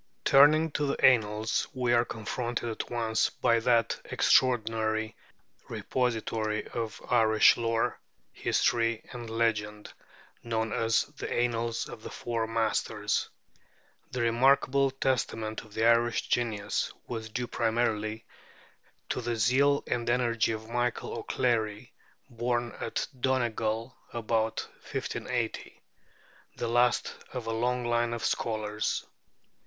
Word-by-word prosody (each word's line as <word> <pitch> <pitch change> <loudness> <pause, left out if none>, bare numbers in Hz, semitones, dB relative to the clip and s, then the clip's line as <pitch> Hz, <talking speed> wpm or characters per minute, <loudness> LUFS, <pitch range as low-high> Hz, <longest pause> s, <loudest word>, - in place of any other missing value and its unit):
Turning 155 +3 +6
to 145 0 -1
the 140 - +2
Annals, 110 -3 +3
we 125 -2 +1
are 120 0 +5
confronted 120 +2 -3
at 115 - -4
once 115 -2 +1
by 115 -2 +2
that 115 -1 +2
extraordinary 110 -3 +2 0.5
repository 110 -3 -1
of 115 -2 -4
Irish 110 -3 +6
lore, 115 -1 0 0.3
history, 115 -1 +1
and 120 -2 -7
legend 105 -2 -1 0.5
known 110 -1 -2
as 115 0 +2
'The 145 - -8
Annals 115 -1 0
of 120 -2 -10
the - - -7
Four 115 -2 -3
Masters.' 115 0 0 0.8
This 125 -2 -3
remarkable 135 +3 +3
testament 115 -5 -1
of 105 -1 -16
the 110 - +1
Irish 115 0 +3
genius 105 -4 0
was 110 -2 -5
due 125 +3 -3
primarily 110 -2 -1 0.8
to - - -1
the 120 0 -2
zeal 135 +6 +3
and 120 -1 -1
energy 120 -2 +2
of 110 0 -5
Michael 120 +1 -2
O'Clery, 115 -2 -1 0.3
born 120 -2 -2
at 115 - -2
Donegal 115 -2 -1 0.2
about 110 -1 -1
1580 - - -4 0.8
the 120 - -3
last 120 +1 +2 0.2
of 125 -3 -4
a 115 - -2
long 125 +2 0
line 120 0 +1
of 115 - -4
scholars. 105 -1 -1
115 Hz, 115 wpm, -29 LUFS, 110-120 Hz, 0.8 s, Turning